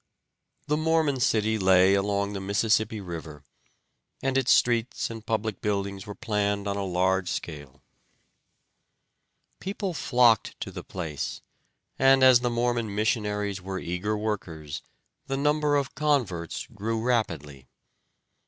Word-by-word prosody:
The 150 +1 +1
Mormon 155 -3 +1
city 110 -2 +2
lay 95 0 +5
along 100 0 0
the 100 - -4
Mississippi 105 +2 +1
River, 80 -5 -8 0.8
and 135 0 0
its 135 -1 +3
streets 120 -1 +2
and 115 -1 -8
public 110 -3 -2
buildings 100 -1 -2
were 105 - -6
planned 100 -1 -1
on 100 - -1
a 100 - -2
large 95 0 +1
scale. 75 -5 -6 1.8
People 195 -1 -3
flocked 125 -6 +3
to - - -4
the - - -7
place, 80 -6 -5 0.6
and 135 0 +5
as 130 -2 +8
the 125 0 0
Mormon 120 -3 -1
missionaries 105 -2 -1
were 95 +1 -5
eager 95 +5 -2
workers 90 -9 -4 0.5
the 135 - -1
number 150 +1 +2
of 140 -2 0
converts 125 - -1
grew 110 +2 -2
rapidly. 80 - -2
105 Hz, 125 wpm, -27 LUFS, 95-120 Hz, 1.8 s, as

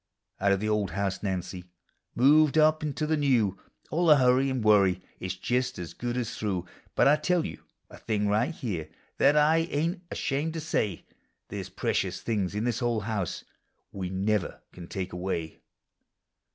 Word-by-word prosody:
Out 100 +1 +2
of 100 - +2
the 110 - -2
old 105 -3 +1
house, 95 +1 -2
Nancy,— 95 -2 -3 0.5
moved 150 +4 +5
up 155 0 +4
into 155 0 -2
the 155 +1 +1
new; 120 -10 +2 0.3
All 170 +2 +1
the 150 -2 +8
hurry 130 +1 +4
and 130 -3 -2
worry 100 -4 +4 0.2
is 95 +1 -4
just 125 +6 -1
as 85 -2 -6
good 120 0 -3
as 120 -2 -3
through; 95 -5 -2 0.3
But - - +4
I 150 +2 +6
tell 175 +2 +1
you - - -7 0.3
a - - -14
thing 105 -2 -1
right 105 +4 +2
here, 95 - -4 0.3
that 140 +2 +5
1 150 +2 +5
ain't 165 +5 -1
ashamed 150 +4 -2
to - - -2
sav. 105 - -1 0.5
There - - -4
's - - -10
precious - - -1
things 100 -4 -1
in 105 - -1
this 120 -1 -1
old 120 -3 0
house 105 -5 -3 0.5
we 95 -2 -4
never 95 +1 -1
can 85 -1 -10
take 95 0 -5
away. 90 -3 -3
110 Hz, 180 wpm, -28 LUFS, 95-145 Hz, 0.5 s, the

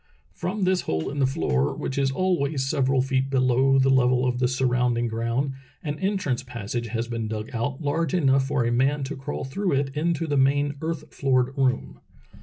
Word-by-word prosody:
From 190 - -3
this 185 0 +2
hole 80 +8 -1
in 145 - -4
the 135 - +4
floor, 70 - 0
which 130 - -4
is 135 -1 +2
always 140 -4 0
several 135 -2 +2
feet 135 0 0
below 130 0 +3
the 135 0 +4
level 125 -1 +3
of 125 -1 0
the 125 - +3
surrounding 125 -2 +1
ground, 115 +4 -1 0.3
an 150 -1 -4
entrance 190 -11 -1
passage 120 -2 -5
has 115 +1 -3
been 115 -2 -3
dug 110 0 -5
out 130 +5 -3
large 155 +2 0
enough 135 -5 +3
for 135 -4 0
a 120 - +1
man 135 +4 +1
to 140 +4 -4
crawl 135 +2 -5
through 180 +7 -1
it 135 0 -1
into 165 +1 0
the 145 -2 0
main 140 +2 +2
earth 165 0 -4
floored 130 -1 +1
room. 130 -2 0
135 Hz, 195 wpm, -25 LUFS, 125-145 Hz, 0.3 s, the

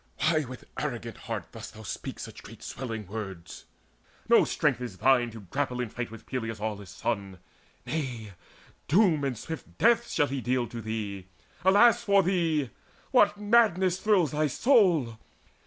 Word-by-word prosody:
why 155 -1 +2
with 130 - -9 0.2
arrogant - - -4
heart - - -6
dost - - -9
thou 110 - -10
Speak - - -6
such - - -9
great - - -13
swelling 115 -4 -5
words? 95 -4 -7 0.6
No - - +6
strength - - 0
is 120 -7 -6
thine 120 +4 +3
To 110 -1 -10
grapple 125 +6 -3
in 125 -3 -2
fight 120 +2 -5
with 115 0 -12
Peleus' 115 -4 -4
aweless 105 -2 -5
son. 100 -1 -3 0.5
Nay, 125 -9 -4 0.6
doom 170 -3 +4
and 135 -4 -1
swift 160 +8 -8
death 235 +1 +3
shall 145 - +2
he 135 -1 -3
deal 125 0 0
to 115 0 -6
thee. 105 -4 -5 0.4
Alas 230 +5 +5
for 200 -3 +4
thee! 165 -7 +1 0.4
What 210 -5 +4
madness 205 -4 +3
thrills 195 -9 +3
thy 150 0 +1
soul? 170 - +3
130 Hz, 155 wpm, -28 LUFS, 110-180 Hz, 0.6 s, No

